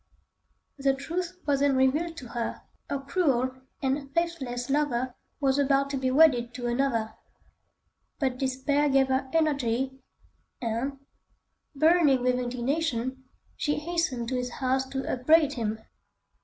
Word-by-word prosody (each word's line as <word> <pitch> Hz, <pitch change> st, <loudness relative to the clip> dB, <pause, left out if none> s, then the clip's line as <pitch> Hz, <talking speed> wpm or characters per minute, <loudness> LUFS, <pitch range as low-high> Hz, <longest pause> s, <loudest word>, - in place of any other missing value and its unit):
The 275 Hz, 0 st, +2 dB
truth 345 Hz, +6 st, -4 dB
was 280 Hz, -2 st, +2 dB
then 280 Hz, -1 st, +3 dB
revealed 300 Hz, +6 st, +1 dB
to 250 Hz, -5 st, -8 dB
her: 235 Hz, -1 st, -4 dB, 0.3 s
her 280 Hz, -, 0 dB
cruel 275 Hz, -4 st, +1 dB, 0.3 s
and 275 Hz, +1 st, -1 dB
faithless 270 Hz, -8 st, -1 dB
lover 260 Hz, -3 st, 0 dB, 0.3 s
was 275 Hz, -1 st, +2 dB
about 275 Hz, 0 st, +2 dB
to 275 Hz, -, -1 dB
be 260 Hz, -1 st, 0 dB
wedded 255 Hz, -5 st, +4 dB
to 245 Hz, -1 st, -5 dB
another. 240 Hz, -3 st, 0 dB, 1.0 s
But 260 Hz, -4 st, -1 dB
despair 280 Hz, +2 st, +1 dB
gave 270 Hz, -1 st, +3 dB
her 265 Hz, 0 st, 0 dB
energy, 265 Hz, -4 st, 0 dB, 0.6 s
and, 240 Hz, +4 st, -2 dB, 0.8 s
burning 310 Hz, -4 st, +4 dB
with 250 Hz, 0 st, +2 dB
indignation, 260 Hz, +1 st, -2 dB, 0.3 s
she 295 Hz, -, 0 dB
hastened 305 Hz, -7 st, -1 dB
to 260 Hz, -, -1 dB
his 250 Hz, -1 st, -3 dB
house 265 Hz, 0 st, 0 dB
to 270 Hz, 0 st, -4 dB
upbraid 295 Hz, +3 st, +3 dB
him. 220 Hz, -4 st, -2 dB
270 Hz, 130 wpm, -27 LUFS, 250-290 Hz, 1.0 s, wedded